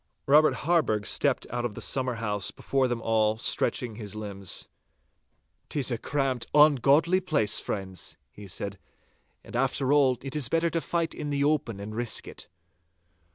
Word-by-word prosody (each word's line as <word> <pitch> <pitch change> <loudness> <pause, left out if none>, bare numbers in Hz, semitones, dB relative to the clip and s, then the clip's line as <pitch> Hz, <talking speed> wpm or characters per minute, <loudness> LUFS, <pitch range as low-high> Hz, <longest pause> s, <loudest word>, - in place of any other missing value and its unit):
Robert 150 +3 +5
Harburgh 150 -11 +2
stepped - - +1
out 120 0 -2
of 115 -4 -3
the - - -7
summer 130 -2 -1
house 105 -4 -1
before 135 -1 0
them 120 -2 -3
all, 110 -1 +2
stretching 115 0 0
his 105 -3 -6
limbs. 100 -3 -4 1.0
''Tis 135 -3 0
a 115 - -2
cramped, 135 -3 -1
ungodly 150 +4 +5
place, 110 - +2
friends,' 95 -3 -3
he 105 -1 -12
said. 100 +2 -6 0.7
'After 135 +2 0
all, 135 -4 +4
it 135 0 -4
is 140 -5 +1
better 165 +1 +1
to 165 - -1
fight 170 -1 -1
in 150 -1 -5
the 140 -1 0
open 145 -8 0
and 105 +2 -7
risk 120 +1 0
it! - - -9
125 Hz, 155 wpm, -27 LUFS, 110-145 Hz, 1.0 s, Robert